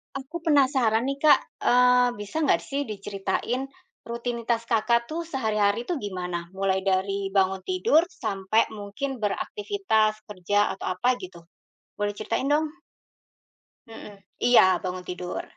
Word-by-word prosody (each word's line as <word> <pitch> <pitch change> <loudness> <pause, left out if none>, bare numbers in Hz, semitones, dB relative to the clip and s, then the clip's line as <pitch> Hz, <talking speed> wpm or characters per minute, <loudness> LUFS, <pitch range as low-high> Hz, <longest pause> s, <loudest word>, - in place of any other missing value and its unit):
Aku 305 +5 -6
penasaran 260 -6 +3
nih 275 - -1
Kak, 300 - +8 0.3
eee, 250 0 +5
bisa 205 +7 -7
nggak - - +3
sih 280 +1 -3
diceritain 205 +3 -3 0.4
rutinitas 235 0 -2
Kakak 235 +1 +2
tuh 335 +2 -4
sehari-hari 220 -8 0
tuh 355 - 0
gimana? 180 - -5
Mulai 190 0 0
dari 195 0 0
bangun 190 0 +2
tidur 370 -3 +3 0.2
sampai 195 +3 +1
mungkin 235 +7 -5
beraktivitas, 220 - 0
kerja 205 +1 +1
atau - - -7
apa 215 +7 0
gitu. 185 -6 -10 0.6
Boleh 205 0 -1
ceritain 215 +5 -2
dong? 300 +1 +1 1.2
Mhm 225 -2 -11 0.3
iya, 245 0 +7 0.2
bangun 185 -1 -4
tidur. 180 0 -4
220 Hz, 125 wpm, -25 LUFS, 195-265 Hz, 1.2 s, Kak